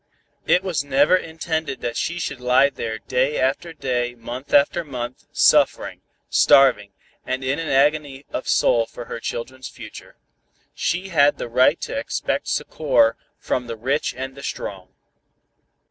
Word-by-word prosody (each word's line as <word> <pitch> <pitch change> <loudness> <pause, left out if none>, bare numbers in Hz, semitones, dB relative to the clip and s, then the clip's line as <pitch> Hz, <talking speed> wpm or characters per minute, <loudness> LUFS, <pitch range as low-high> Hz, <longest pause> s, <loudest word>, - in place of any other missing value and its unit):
It 180 - +3
was 170 -7 -1
never 145 +5 +3
intended 160 -4 -3
that 120 -1 -3
she 170 +7 -2
should 140 -6 -4
lie 130 +3 +4
there 115 -4 -4
day 130 +5 -1
after 135 +6 0
day 125 -5 -2
month 120 +3 -8
after 190 -3 +3
month, 125 -4 -7
suffering, - - +3 0.3
starving, 105 -8 +4 0.3
and 130 +1 -3
in 135 +4 -1
an 165 - -4
agony 140 0 +1
of - - -4
soul 115 -1 +3
for 120 - -9
her 115 - -6
children's 130 +3 -6
future. 110 -3 -12 0.6
She 185 +3 -2
had 145 -4 +4
the - - -5
right 125 +2 +3
to - - -4
expect - - -2
succor 115 0 +1 0.2
from 125 -1 -3
the 115 -1 -6
rich 135 +6 -1
and 130 +1 -5
the 140 - -11
strong." 95 -7 -6
130 Hz, 150 wpm, -22 LUFS, 120-150 Hz, 0.6 s, lie